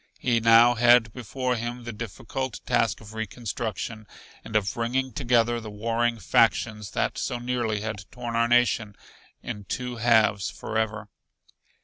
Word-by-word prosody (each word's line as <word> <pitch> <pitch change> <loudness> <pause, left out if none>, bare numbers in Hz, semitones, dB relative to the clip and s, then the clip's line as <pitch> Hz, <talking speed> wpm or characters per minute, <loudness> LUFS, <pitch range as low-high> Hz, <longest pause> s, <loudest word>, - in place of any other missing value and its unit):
He 120 -2 +1
now 115 +1 +6
had 120 -1 +5
before 125 +1 -2
him 120 +1 -5
the 120 -1 -6
difficult 115 +4 -5
task 115 -3 +1
of 110 0 -12
reconstruction, 110 -1 -5 0.4
and 110 - -9
of 100 -2 +1
bringing 125 +2 -1
together 120 -2 +1
the 110 - -8
warring 115 +3 -1
factions 105 +2 +1
that - - -1
so 130 -2 -2
nearly 120 -3 -2
had 105 -3 -5
torn 120 -2 -6
our 115 0 +3
nation 120 -3 +2 0.5
in 105 -4 -6
two 125 +2 -4
halves 110 -4 +3
forever. 110 -1 -3
115 Hz, 140 wpm, -26 LUFS, 110-120 Hz, 0.5 s, now